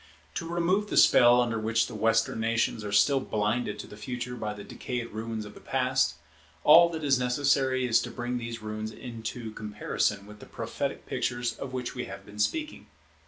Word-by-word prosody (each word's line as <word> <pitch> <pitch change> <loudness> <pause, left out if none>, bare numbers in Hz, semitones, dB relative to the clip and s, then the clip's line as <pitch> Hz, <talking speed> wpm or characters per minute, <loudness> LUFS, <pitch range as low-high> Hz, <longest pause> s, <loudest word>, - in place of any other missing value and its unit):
To 165 - -4
remove 175 +5 +1
the - - -1
spell 120 0 +7
under 115 -2 +1
which 110 +1 +1
the - - -8
Western 115 +1 +1
nations 115 -1 0
are 105 - -4
still 105 +7 +4
blinded 105 -1 -1
to - - -7
the - - -11
Future 125 +3 -5
by 105 -3 -4
the 100 - -9
decayed 120 +2 -5
ruins 110 0 -4
of 105 - -10
the - - -13
Past, 130 - +1 0.5
all 170 +3 +8
that 160 -2 -5
is 135 -3 +3
necessary 130 0 +2
is 115 -2 +4
to - - -5
bring 120 0 -3
these 115 -1 -6
ruins 110 0 -4
into 115 0 -6
comparison 105 -1 -2
with 105 0 -13
the - - -12
prophetic - - -4
pictures 120 -1 -1
of 135 - -7
which 125 -1 -4
we 125 - -4
have 95 0 -9
been 105 0 -12
speaking. 305 - -1
115 Hz, 195 wpm, -28 LUFS, 110-130 Hz, 0.5 s, all